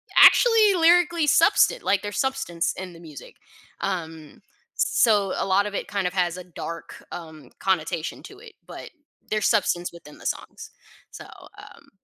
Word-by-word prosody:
actually 450 -4 +6
lyrically 340 -1 +3
substant 410 - +3
like, 200 -1 +1
there's 205 -1 -6
substance 175 -11 -1
in 185 -1 -7
the 165 - -14
music. 155 -5 -12 0.5
Um, 165 -5 -5 0.3
so, 215 -9 +2
a - - -2
lot 195 +1 +2
of 205 -1 -5
it - - -4
kind 200 -3 -2
of 180 - -5
has 180 -2 -1
a 180 - -8
dark, 170 -1 -9
um, 160 -3 -10
connotation 170 -3 -2
to 400 - -13
it, 450 0 -14
but - - -10 0.4
there's 215 0 0
substance 175 -5 0
within 160 -3 -14
the - - -16
songs. - - -6 0.4
So, - - -11 0.3
um - - -15
195 Hz, 160 wpm, -24 LUFS, 170-280 Hz, 0.5 s, actually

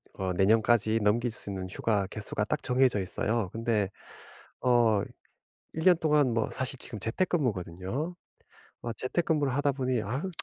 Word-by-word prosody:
어 95 -1 -2
내년까지 110 +3 +3
넘길 115 +3 +2
수 105 - -6
있는 95 -2 -4
휴가 100 0 0
개수가 105 0 -2
딱 - - -2
정해져 125 -3 +2
있어요. 105 +2 -1
근데 110 -4 0 0.7
어 120 -4 +4 0.7
1 160 - -3
년 180 -2 +7
동안 150 -6 +3
뭐 115 - +1
사실 130 0 -1
지금 120 -3 -7
재택근무거든요. 115 - -2 0.7
어 120 -1 -3
재택근무를 145 -1 0
하다 145 0 +2
보니 130 -3 0
아우 130 - -3
115 Hz, 300 characters per minute, -29 LUFS, 105-135 Hz, 0.7 s, 년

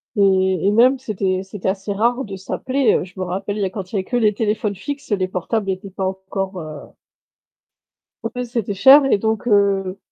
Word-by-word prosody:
et 190 -2 +3
et 205 - +4
même 250 +5 +5
c'était 190 -6 -1
c'était 190 -1 -4
assez 195 +1 -3
rare 240 +6 +1
de 200 -2 -7
s'appeler, 255 +6 0
heu. - - 0
Je 190 +1 -12
me - - -1
rappelle 195 +3 -3
il - - -2
y - - +2
a 190 - -1
quand 190 -1 -7
il - - -5
y - - +2
a 185 - -2
que 245 - -4
les 215 -3 +3
téléphones 210 -1 -1
fixes, 280 +6 -7
les 190 -2 +1
portables 195 +3 -2
étaient 190 +1 -6
pas 190 0 -4
encore, 190 0 -4
heu 155 -3 -9 1.5
Ouais, 250 - -2
c'était 235 -4 -3
cher, 270 +8 +7
et 270 - +3
donc, 220 +3 -1
heu, 200 -3 +2
200 Hz, 215 wpm, -20 LUFS, 190-220 Hz, 1.5 s, cher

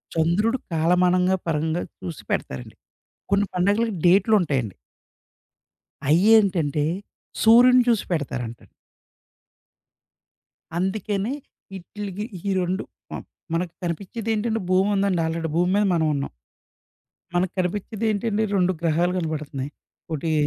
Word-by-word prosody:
చంద్రుడు 180 +10 +2
పేలమానంగా 180 +3 +3
పరంగా 160 +2 0 0.2
చూసి 175 -4 -7
పెడతారండి. 65 -2 -3 0.6
కొన్ని 200 0 +3
పండగలకి 205 +4 +1
డేటులుంటాయండి. 175 - +3 1.3
అయ్యేంటంటే 175 -5 +4 0.6
సూర్యుడిని 245 +3 +7
చూసి 230 -4 +3
పెడతారంట. 125 -7 -3 2.2
అందుకనే, 200 +4 -1 0.4
ఇట్లికి 200 +2 -6 0.2
ఈ - - 0
రెండు 180 +1 -1 0.3
మ - - -5 0.4
మనకు 170 0 -1
కనిపిచ్చేదేంటండి, 220 +5 -2
భూముందండి 195 -1 +2
ఆల్రెడీ 165 0 -2
భూమి 175 +2 +2
మీద 205 0 +3
మనవున్నాం. 155 -4 0 1.0
మనకు 180 +1 +1
కనిపిచ్చేదేంటండి, 210 +3 -1
2 185 -1 +3
గ్రహాలు 170 +2 +2
గనబడతన్నయి. 150 -4 -4 0.4
ఒటీ, 160 +2 -2
180 Hz, 90 wpm, -24 LUFS, 165-205 Hz, 2.2 s, సూర్యుడిని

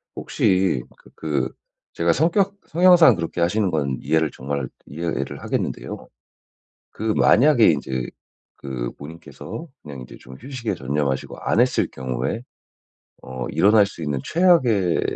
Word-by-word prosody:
혹시 95 -9 +1
그 - - -20
그 75 -3 -2 0.4
제가 85 0 +2
성격 190 +6 +1
성향상 175 0 +6
그렇게 85 0 -4
하시는 95 +4 +1
건 70 -5 -1
이해를 80 -1 +1
정말 70 +2 -4 0.2
이해를 85 +4 -4
하겠는데요. - - -4 0.8
그 - - -11
만약에 125 -1 +5
인제 65 -4 -3 0.5
그 65 -3 -5
본인께서 80 - -9
그냥 70 -4 -9
인제 60 - -11
좀 65 +1 -12
휴식에 130 -4 -4
전념하시고 70 0 -2
안 110 - +1
했을 125 +1 +2
경우에 65 - -3 0.8
어 65 -2 -6
일어날 105 +1 +4
수 100 -4 -10
있는 75 -3 -2
최악의 130 - +3
85 Hz, 280 characters per minute, -22 LUFS, -, 0.8 s, 성향상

